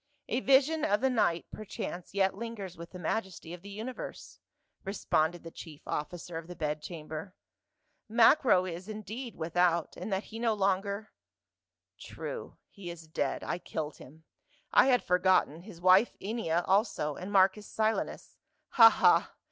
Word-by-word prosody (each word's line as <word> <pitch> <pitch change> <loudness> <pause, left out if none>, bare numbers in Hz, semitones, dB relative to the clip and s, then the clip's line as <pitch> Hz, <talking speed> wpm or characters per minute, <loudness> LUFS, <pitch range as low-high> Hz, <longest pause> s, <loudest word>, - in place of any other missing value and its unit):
" 290 - -44
A 240 - 0
vision 275 +4 +3
of 205 - +2
the 265 +1 +2
night 175 -8 +1
perchance 195 -4 -7
yet 195 -1 +3
lingers 205 -4 -6
with 170 0 -9
the 185 - -10
majesty 180 -2 -3
of 175 - -9
the 200 - -11
universe," 220 +5 -7 0.4
responded 175 -4 0
the 165 - -9
chief 155 -4 -11
offi 150 +4 -3
cer 165 -1 -6
of 165 - -12
the 180 - -8
bed 150 -1 -2
chamber. 160 +3 -7 0.4
" - - -48
Macro 225 -8 +5
is 180 +3 -6
indeed 220 +3 -6
without, 170 0 +1
in - - -6
that 195 0 -1
he 225 - -9
no 230 -2 +1
longer 200 +1 -1 0.3
— 95 -1 -62
" 90 +1 -60
"True, - - -7
he 190 -3 -9
is 170 -1 -9
dead; 150 -3 -2
I 175 - -3
killed 155 -4 -5
him. 160 +4 -15 0.5
I - - +7
had 250 -2 +3
forgotten, 180 -3 +2
his 185 -3 -12
wife 185 +5 +5
Ennia 190 -6 -1
also, 190 -7 +1
and 185 +3 -7
Marcus 195 +1 +3
Silanus. 220 0 -2 0.3
Ha, 225 -3 +9
ha - - +3
185 Hz, 170 wpm, -30 LUFS, 165-215 Hz, 0.5 s, Ha